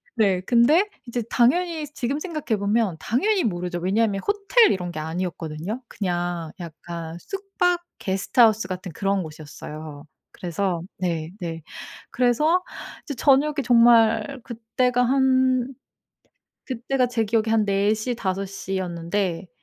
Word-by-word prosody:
네. 195 -5 +2
근데 285 - +5 0.2
이제 240 0 -2
당연히 320 +5 +2
지금 275 +4 -2
생각해 305 - -2
보면 205 -3 +1
당연히 385 - +1
모르죠. 175 -3 -2
왜냐하면 195 +2 +1
호텔 415 +3 +4
이런 180 -2 -2
게 155 - -6
아니었거든요. 170 +5 -4
그냥 175 -3 -3
약간 170 0 -7
숙박 380 - -1 0.2
게스트하우스 215 +3 +3
같은 185 -1 -5
그런 195 -1 0
곳이었어요. 155 -1 -9 0.3
그래서 175 0 -2 0.2
네 165 -3 -2
네 165 -2 -5 0.5
그래서 300 +9 +2 0.4
이제 285 - -5
저녁에 280 +4 +4
정말 230 +1 +4
그때가 245 +1 0
한 260 0 +2 1.0
그때가 255 0 0
제 230 -2 0
기억에 220 +1 +1
한 220 -1 +3
4 200 +2 +2
시, 240 +3 -3
5 195 -2 -2
시였는데 185 -1 -3
220 Hz, 270 characters per minute, -24 LUFS, 180-255 Hz, 1.0 s, 근데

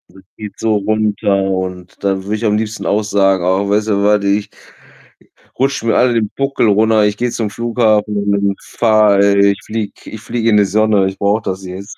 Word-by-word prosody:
Das 95 - -16
zieht 105 -2 -9
so 110 -1 +1
runter, 105 0 0
und 95 -1 -5
dann 95 -1 -1
würde 105 +2 -2
ich 110 +1 -4
am 105 0 +2
liebsten 110 0 -4
auch 105 +1 +1
sagen: 95 -3 +1
„Ach, 95 +2 0
weißt 105 +2 +1
du 100 -1 0
was, 105 0 +2
ich“ 100 +1 0 1.1
„rutscht 135 -2 0
mir 115 - +1
alle 125 -1 +3
den 110 -2 0
Buckel 135 -4 0
runter, 110 +1 +3
ich 105 0 0
gehe 120 +1 -1
zum 110 -3 -3
Flughafen 110 -2 0
und 100 0 0
und 100 - -6
fahre 105 -3 +2
äh, 100 0 +4
ich 100 - -7
fliege 110 -2 -4 0.2
ich 110 - -8
fliege 115 0 -2
in 105 - +4
die 105 - +4
Sonne, 105 0 +2
ich 95 0 -6
brauche 105 +2 0
das 95 0 -4
jetzt.“, 95 +3 -9
105 Hz, 210 wpm, -15 LUFS, 100-110 Hz, 1.1 s, äh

